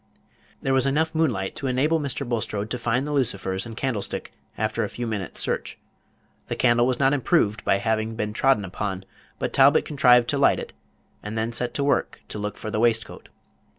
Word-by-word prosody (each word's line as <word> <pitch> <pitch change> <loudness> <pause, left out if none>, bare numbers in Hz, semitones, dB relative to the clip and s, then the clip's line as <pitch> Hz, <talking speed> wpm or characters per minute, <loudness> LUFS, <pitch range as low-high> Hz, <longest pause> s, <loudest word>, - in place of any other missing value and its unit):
There 135 - +1
was 135 0 +3
enough 160 +4 +1
moonlight 125 -13 0
to 135 - -3
enable 145 +6 +2
Mr. 140 -2 -3
Bulstrode 110 -3 -2
to 125 - -2
find 120 +3 0
the 150 - -4
lucifers 100 -7 -1
and 115 -1 -9
candlestick 120 -7 -3 0.2
after 110 0 -1
a 105 - -2
few 120 - -5
minutes 105 -6 -3
search. - - -2 0.7
The - - -3
candle 120 -1 +3
was 130 - 0
not 135 0 +3
improved 110 -6 +1
by - - +3
having 110 +1 -1
been 105 -1 -3
trodden 130 -3 +2
upon; 95 0 -4 0.3
but - - -3
Talbot 140 +3 +5
contrived 125 -5 +4
to 140 - 0
light 140 - +4
it, - - -8 0.5
and 105 +2 -6
then 110 +1 -1
set 120 +1 -4
to 140 - 0
work 140 - 0
to 105 - -6
look 105 0 -4
for 110 - -6
the 105 - -1
waistcoat. 115 -1 0
120 Hz, 195 wpm, -24 LUFS, 105-135 Hz, 0.7 s, Talbot